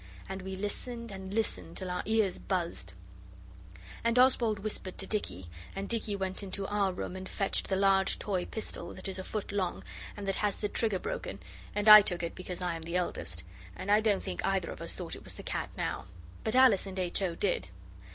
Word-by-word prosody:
And 190 0 -5
we 190 +1 -5
listened 235 +4 -4
and 190 -1 -7
listened 90 - -1
till 185 - -3
our 180 - -1
ears 220 -4 +2
buzzed. 170 - -2 1.1
And 230 +1 +2
Oswald 245 -4 +5
whispered 195 -2 -4
to 195 - 0
Dicky, 95 - -3 0.3
and 195 +1 -3
Dicky 225 -3 0
went 190 0 -2
into 195 0 -3
our 200 -1 +1
room 180 0 -5
and 185 0 -6
fetched 195 - 0
the 190 - +2
large 195 0 +4
toy 190 -4 -1
pistol 170 -5 -6
that 185 - -5
is 190 0 -3
a - - -4
foot 210 +2 -4
long, 190 -3 -1 0.3
and 200 -1 -5
that 195 - +1
has 210 -2 +1
the 210 - -1
trigger 215 -4 +2
broken, - - -4 0.4
and 210 +1 0
I 215 0 +13
took 175 -3 0
it 170 - -2
because 180 0 -6
I 175 -2 0
am 165 - -6
the 170 +2 -4
eldest; 90 - -2 0.3
and 200 - -2
I 210 +1 +6
don't 210 -3 +2
think 90 - -4
either - - +1
of - - -8
us - - -2
thought - - -5
it - - -11
was - - -3
the - - -8
cat - - -2
now. - - -2 0.4
But 220 - 0
Alice 250 -7 +6
and 190 0 -6
H. 180 +1 0
O. 180 -3 0
did. - - 0
195 Hz, 215 wpm, -31 LUFS, 185-210 Hz, 1.1 s, I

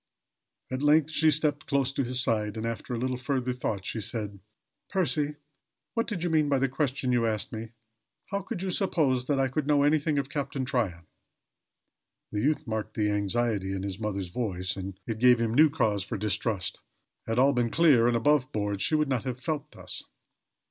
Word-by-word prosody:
At 130 +1 -2
length 150 +1 +4
she 160 0 +4
stepped 150 -1 +1
close 135 -1 +1
to 140 - 0
his 125 +1 -1
side 105 -2 0
and 110 - -3
after 115 +1 -3
a - - -2
little 130 +1 -1
further 125 0 -1
thought 105 -6 -3
she 110 - -2
said: 105 -2 -4 0.5
"Percy, 155 -6 0 0.6
what 230 +1 0
did 185 -6 -3
you 175 - 0
mean 155 -2 +3
by 140 - +3
the 135 +1 +2
question 135 -1 -1
you 120 -2 +2
asked 110 -2 -2
me? 110 0 -6 0.6
How 200 0 -1
could 185 -1 -5
you 190 - -1
suppose 140 -10 +1
that 145 -2 +1
I 135 - +3
could 140 +2 -2
know 145 -1 +4
anything 150 0 +2
of 140 -2 0
Captain 140 -2 -3
Tryon?" 100 -10 -1 1.3
The 105 - -1
youth 150 +5 +1
marked 110 -2 -4
the 105 -1 +1
anxiety 105 -1 0
in 95 - -4
his 100 -1 -4
mother's 100 -4 -3
voice 95 -4 -2
and 95 0 -6
it 110 -2 -4
gave 125 0 +6
him 115 -1 0
new 155 +5 +6
cause 105 -10 +1
for 100 - -4
distrust. 105 -1 -1 0.5
Had 115 +1 -1
all 135 +2 +5
been 120 -2 +1
clear 140 -6 +5
and 120 -1 +3
above 135 +1 +2
board 105 -2 -2
she 155 - +2
could 150 -1 +1
not 130 -4 0
have 130 -1 -3
felt 150 +1 -3
thus. - - -7
125 Hz, 200 wpm, -28 LUFS, 110-145 Hz, 1.3 s, gave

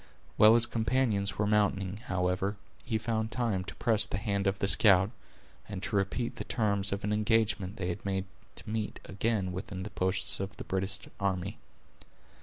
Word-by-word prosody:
While 110 +1 +7
his 120 0 +5
companions 110 -4 0
were 105 - +1
mounting, 100 -2 +1
however, 95 -1 -1 0.3
he 115 -2 -1
found 110 0 -1
time 115 -6 -1
to - - -8
press 110 -3 +4
the - - -3
hand 100 -1 -1
of 95 0 +1
the 100 - 0
scout, 95 -1 +6 0.6
and 100 -2 -5
to 110 - -2
repeat 100 +5 -1
the - - -3
terms 100 -4 0
of 100 0 -3
an 105 +1 0
engagement 105 -2 +1
they 90 -4 -3
had 85 - -4
made 95 -1 -1 0.3
to - - -5
meet 110 -1 -3
again 100 -1 -1
within 95 0 -5
the 105 - -7
posts 95 0 0
of 95 0 -5
the - - -6
British 95 +1 -2 0.2
army. 100 +1 -2
100 Hz, 180 wpm, -30 LUFS, 95-110 Hz, 0.6 s, While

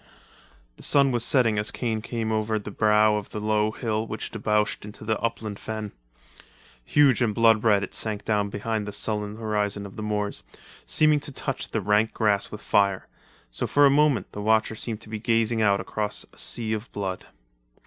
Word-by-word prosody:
The - - -14
sun 140 -2 +3
was 120 -2 0
setting 115 -5 +3
as 105 - 0
Kane 110 -3 -2
came 115 -1 -3
over 110 0 0
the 105 0 -6
brow 105 0 +3
of 105 - -6
the 105 - -5
low 105 0 +1
hill 110 -1 -2
which 110 - -5
debouched 105 -1 0
into 105 +1 -9
the 110 -1 0
upland 110 -3 -3
fen. 110 -2 -5 0.9
Huge 140 - +4
and 110 -4 +1
blood 115 -2 +4
red 105 -3 +4
it 100 - -6
sank 105 -2 -1
down 105 -2 +1
behind 105 +1 -3
the 105 - -5
sullen 105 0 -1
horizon 105 -2 -1
of 100 - -11
the - - -5
moors, 105 -1 -2 0.5
seeming 155 - +4
to 145 - -8
touch 135 0 -4
the 110 - -2
rank 105 +3 +2
grass 105 -3 +2
with 105 - -8
fire; 100 -2 +2 0.4
so - - -3
for 145 0 +4
a 140 - +6
moment 145 -2 +2
the 105 - -6
watcher 110 +1 +2
seemed 110 0 -5
to - - -11
be 110 -1 -4
gazing 115 0 +1
out 100 -2 +3
across 105 -1 -4
a - - -20
sea 110 -2 -1
of 110 +2 -5
blood. 95 -2 -4
110 Hz, 195 wpm, -25 LUFS, 105-115 Hz, 0.9 s, a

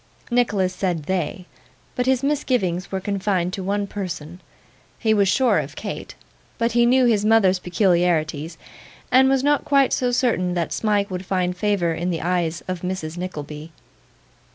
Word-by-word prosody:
Nicholas 205 -7 +1
said 180 -4 -2
'they', 180 +1 -2 0.5
but 250 0 -1
his 260 0 +2
misgivings 245 -11 0
were 190 - -1
confined 190 -2 -1
to 195 - -4
one 200 +2 -1
person. 175 -4 -6 0.6
He 220 -1 +2
was 200 -2 +3
sure 255 +6 +3
of - - -6
Kate, - - -6 0.4
but 230 0 +1
he 235 +1 +3
knew 255 +1 +4
his 220 -4 +2
mother's 210 -4 +4
peculiarities, 170 -4 0 0.5
and 265 +1 +6
was 270 -1 +2
not 290 0 +2
quite 275 -2 +3
so 250 -1 +1
certain 200 -8 +1
that 170 -2 -1
Smike 205 -2 0
would 180 0 -4
find 180 -1 -1
favour 180 -3 0
in 175 +2 -2
the 165 -3 -2
eyes 170 -2 -1
of 185 -2 -4
Mrs 180 -3 -4
Nickleby. 155 -3 -6
190 Hz, 160 wpm, -22 LUFS, 175-225 Hz, 0.6 s, and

